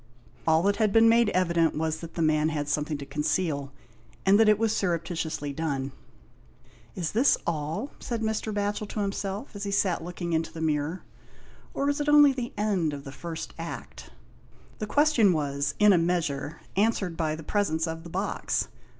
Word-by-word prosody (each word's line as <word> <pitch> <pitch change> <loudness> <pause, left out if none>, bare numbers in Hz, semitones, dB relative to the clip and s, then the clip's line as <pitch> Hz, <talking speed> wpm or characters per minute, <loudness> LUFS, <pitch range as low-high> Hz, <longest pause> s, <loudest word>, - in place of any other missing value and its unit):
All 160 +1 +4
that 200 +1 +2
had 215 -1 +2
been 225 +2 +6
made 230 -1 +5
evident 170 -3 +2
was 160 0 -1
that 165 -1 -9
the 165 - 0
man 155 0 +3
had 150 -2 -2
something 150 +1 -1
to 140 - -7
conceal, 150 -1 -1 0.5
and 195 +2 +5
that 220 -1 +6
it 210 - +5
was 225 0 +1
surreptitiously 165 -5 -2
done. 140 -3 -2 1.0
"Is 170 -4 -2
this 245 +6 +4
all?" 165 - -2
said 230 -2 -3
Mr. 220 0 -1
Batchel 205 0 -2
to 215 - -3
himself 200 +3 -4
as 200 - -5
he 200 - -2
sat 195 -4 +1
looking 175 0 -4
into 160 0 0
the 165 - -8
mirror, 155 +2 -1 0.3
" - - -25
or 280 - 0
is 285 +1 0
it 295 - 0
only 295 -2 +7
the 245 -2 -4
end 195 -7 0
of 140 -1 -6
the 135 - -8
first 165 +2 -6
Act? 165 0 -7 0.4
" - - -27
The 215 - -3
question 275 -7 +4
was, 140 -2 -1
in 210 -1 +6
a 175 - +4
measure, 165 -3 -1
answered 200 -4 +1
by 155 -2 -1
the 160 - -9
presence 160 -3 0
of 165 -1 -5
the 170 - -10
box. 190 +4 -2
170 Hz, 190 wpm, -27 LUFS, 155-210 Hz, 1.0 s, only